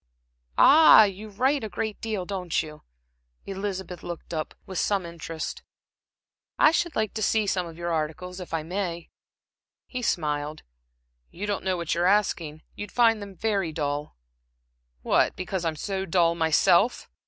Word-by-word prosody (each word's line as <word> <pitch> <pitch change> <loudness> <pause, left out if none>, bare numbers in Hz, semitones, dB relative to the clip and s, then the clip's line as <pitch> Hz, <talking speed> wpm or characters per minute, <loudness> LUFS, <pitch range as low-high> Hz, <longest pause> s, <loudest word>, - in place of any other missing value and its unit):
"Ah! 310 -6 +8
You 205 +1 -3
write 260 +6 +1
a 220 - -4
great 215 +3 -4
deal, 215 -5 -3
don't 180 -4 -1
you?" 150 -1 -11 0.6
Elizabeth 190 -3 -5
looked 175 0 -7
up 155 -1 -4
with 190 -2 -4
some 200 -3 0
interest. 165 -1 -6 1.0
"I 305 - +6
should 345 0 -1
like 220 -2 -1
to 220 - -4
see 215 +1 +2
some 185 -3 -1
of 165 -1 -11
your 170 0 -3
articles, 160 +4 -3
if 180 - -9
I 165 -1 -1
may." 175 -1 -4 0.7
He 255 - -5
smiled. 150 -7 -2 0.7
"You 195 +4 -6
don't 205 -1 -2
know 185 -1 0
what 170 -1 -2
you're 175 +2 +1
asking. 170 -6 +1
You'd 205 -1 -7
find 230 -3 +3
them 200 -1 -9
very 195 -4 -1
dull." 145 - -3 0.9
"What, - - +2
because 185 0 -3
I'm 165 -2 -1
so 195 +4 -3
dull 170 -1 +3
myself?" 170 +6 +3
185 Hz, 155 wpm, -26 LUFS, 165-205 Hz, 1.0 s, Ah